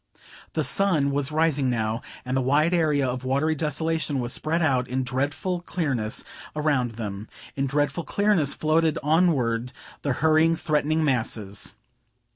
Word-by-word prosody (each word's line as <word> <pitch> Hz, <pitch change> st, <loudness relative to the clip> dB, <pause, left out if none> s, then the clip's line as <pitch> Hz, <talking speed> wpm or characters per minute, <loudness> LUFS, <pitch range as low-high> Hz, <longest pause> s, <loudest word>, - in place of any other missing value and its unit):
The 155 Hz, -, 0 dB
sun 150 Hz, 0 st, +2 dB
was 140 Hz, +1 st, 0 dB
rising 150 Hz, -4 st, +2 dB
now, 115 Hz, -1 st, -1 dB, 0.2 s
and 130 Hz, +1 st, -2 dB
the 130 Hz, -, +2 dB
wide 150 Hz, +6 st, +2 dB
area 150 Hz, -5 st, +2 dB
of 125 Hz, 0 st, -3 dB
watery 140 Hz, +5 st, +1 dB
desolation 155 Hz, -1 st, -1 dB
was 120 Hz, -1 st, -2 dB
spread 165 Hz, +2 st, 0 dB
out 130 Hz, -4 st, +2 dB
in 130 Hz, +2 st, -1 dB
dreadful 145 Hz, +8 st, -2 dB
clearness 135 Hz, -12 st, -2 dB, 0.3 s
around 145 Hz, -6 st, +1 dB
them; 105 Hz, -2 st, -6 dB, 0.3 s
in 135 Hz, 0 st, 0 dB
dreadful 145 Hz, +5 st, 0 dB
clearness 200 Hz, -9 st, +1 dB
floated 155 Hz, 0 st, +2 dB
onward 135 Hz, -7 st, +2 dB, 0.3 s
the 140 Hz, -, 0 dB
hurrying, 160 Hz, +4 st, +3 dB
threatening 155 Hz, 0 st, 0 dB
masses. 110 Hz, -7 st, -1 dB
145 Hz, 140 wpm, -25 LUFS, 125-160 Hz, 0.3 s, hurrying